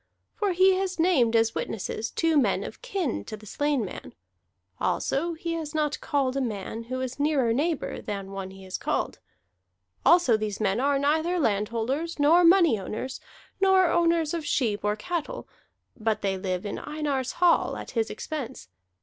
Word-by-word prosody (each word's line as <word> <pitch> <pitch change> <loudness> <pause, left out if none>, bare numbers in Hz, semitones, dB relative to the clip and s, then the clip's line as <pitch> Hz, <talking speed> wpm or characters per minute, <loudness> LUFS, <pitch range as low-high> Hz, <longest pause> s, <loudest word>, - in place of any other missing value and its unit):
For 405 -3 0
he 375 +2 +5
has 380 -1 -2
named 305 -10 +3
as 225 0 +3
witnesses 220 +1 -3
two 330 -1 +1
men 285 - +2
of - - -8
kin 390 - -2
to 215 - -7
the 215 - -15
slain 290 +1 0
man; 180 - -9 0.6
also 335 +5 0
he 335 +1 -4
has 315 -2 -5
not 300 -1 0
called 275 -2 0
a 275 - 0
man 225 -1 -4
who 255 +2 -4
is 260 +1 -4
nearer 285 -6 +2
neighbor 300 +4 -1
than 200 -2 -5
one 195 -1 -5
he 190 0 -12
has 185 0 -5
called. - - -2 0.8
Also 340 -10 +5
these 210 -2 -3
men 205 0 +1
are 280 +2 +2
neither 315 +5 +1
landholders, 235 +7 -1
nor 315 +5 +5
money 335 - +5
owners, 220 +7 -5 0.4
nor 380 -2 +4
owners 335 -2 +2
of 335 -2 -2
sheep 225 -8 0
or 210 0 +1
cattle; 355 - -4 0.5
but 220 -2 -1
they 195 -1 +1
live 185 0 -3
in 205 - -4
Einar's 290 -4 -2
hall 350 -1 +3
at - - -8
his 225 -2 0
expense. 260 - -6
275 Hz, 170 wpm, -26 LUFS, 220-330 Hz, 0.8 s, he